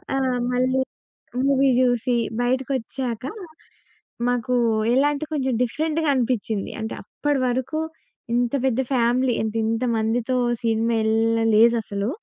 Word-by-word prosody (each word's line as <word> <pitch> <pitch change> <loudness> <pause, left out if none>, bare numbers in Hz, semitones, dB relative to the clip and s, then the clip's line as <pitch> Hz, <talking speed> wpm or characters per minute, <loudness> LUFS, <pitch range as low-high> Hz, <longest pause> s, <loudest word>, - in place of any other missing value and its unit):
ఆ! - - +1 0.4
మళ్ళీ 255 +1 +2 0.6
మూవీ 275 -1 +3
చూసి 245 0 +2 0.3
బయటకొచ్చాక, 255 -1 -2 1.1
మాకు 245 0 -1 0.4
ఎలాంటే 285 +3 +2
కొంచెం 265 -4 0
డిఫరెంట్‌గా 315 +4 -1
అనిపించింది. 230 -5 -1
అంటే 220 - -4
అప్పటివరకు 260 +2 -1 0.5
ఇంత 240 +1 +1
పెద్ద 260 -2 +1
ఫ్యామిలీ. 245 +1 +2
ఎంత 220 0 -3
ఇంత 225 +2 -1
మందితో 230 +3 0 0.3
సినిమా 230 0 +1
ఏళ్లలేదసలు. 225 -1 +2
245 Hz, 100 wpm, -23 LUFS, 225-265 Hz, 1.1 s, మూవీ